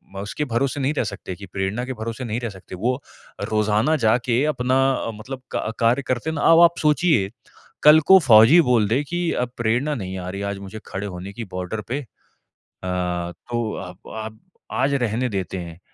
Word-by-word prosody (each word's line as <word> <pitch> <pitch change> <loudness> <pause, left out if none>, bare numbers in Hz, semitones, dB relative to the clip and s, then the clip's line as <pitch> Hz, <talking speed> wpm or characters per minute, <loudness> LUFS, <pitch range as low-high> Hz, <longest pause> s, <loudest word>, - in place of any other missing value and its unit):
अ, - - -5
उसके 105 +9 -3
भरोसे 135 +3 0
नहीं 135 +2 0
रह - - +2
सकते 95 -1 -7
कि 100 - -10
प्रेरणा 100 +5 -2
के 130 - -4
भरोसे 115 +3 -5
नहीं 115 0 -2
रह 120 -2 -3
सकते। 95 -2 -10
वो 125 +8 -1 0.5
रोज़ाना 110 +7 +2
जाके 120 +3 +2
अपना 130 +1 +2
अ, 115 - -3
मतलब 130 +5 -8
क 110 - -1
कार्य 120 +3 +3
करते 130 +5 -1
ना 150 -2 -3
अब 165 - +7
आप 170 0 +5
सोचिए 150 - +2 0.5
कल 150 +1 +9
को 190 - +9
फौजी 115 +6 +7
बोल 120 -8 +3
दे 125 +7 +1
कि 175 +4 -4
अ, 125 - 0
प्रेरणा 120 +6 0
नहीं 95 -5 -5
आ 90 0 -5
रही 100 +2 -5
है 100 - -2
आज 100 0 -3
मुझे 100 +2 -8
खड़े 100 +1 -4
होने 90 0 -7
की 115 - -6
बॉर्डर 90 +4 -4
पे 130 +4 -2
अ, - - -12 0.8
तो 90 +5 -3
आप 90 +1 -10
आप 110 0 -6 0.3
आज 135 +2 +1
रहने 125 -1 0
देते 95 -3 -3
हैं, 85 -2 -8
115 Hz, 200 wpm, -22 LUFS, 100-130 Hz, 0.8 s, कल